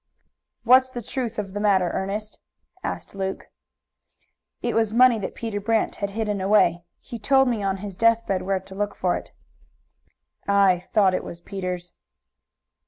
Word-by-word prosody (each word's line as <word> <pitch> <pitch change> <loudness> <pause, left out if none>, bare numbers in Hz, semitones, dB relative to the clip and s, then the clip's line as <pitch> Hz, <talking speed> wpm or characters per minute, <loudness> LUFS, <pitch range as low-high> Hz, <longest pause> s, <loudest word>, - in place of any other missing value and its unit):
"What's 255 +2 +6
the 245 -2 -7
truth 240 -1 -4
of 195 -2 -4
the 205 - -3
matter, 190 -4 +2
Ernest?" 210 +3 -4 0.4
asked - - -5
Luke. 190 -1 -5 1.1
"It - - 0
was 225 -2 +1
money 240 0 +5
that 200 - -5
Peter 220 -3 -4
Brant 225 +1 0
had 200 - -2
hidden 210 -3 -1
away. 190 -3 +3 0.2
He 235 -3 -9
told 265 +5 +4
me 235 -4 0
on 195 -1 -1
his 200 -2 -7
death 230 +2 +3
bed 190 -2 -1
where 190 +1 -1
to 190 +1 -14
look 205 +1 -3
for 180 -1 0
it." - - -7 1.2
"I 195 -3 +3
thought 200 -4 +4
it - - -1
was 170 - -8
Peter's." 180 -1 -5
205 Hz, 165 wpm, -24 LUFS, 190-225 Hz, 1.2 s, What's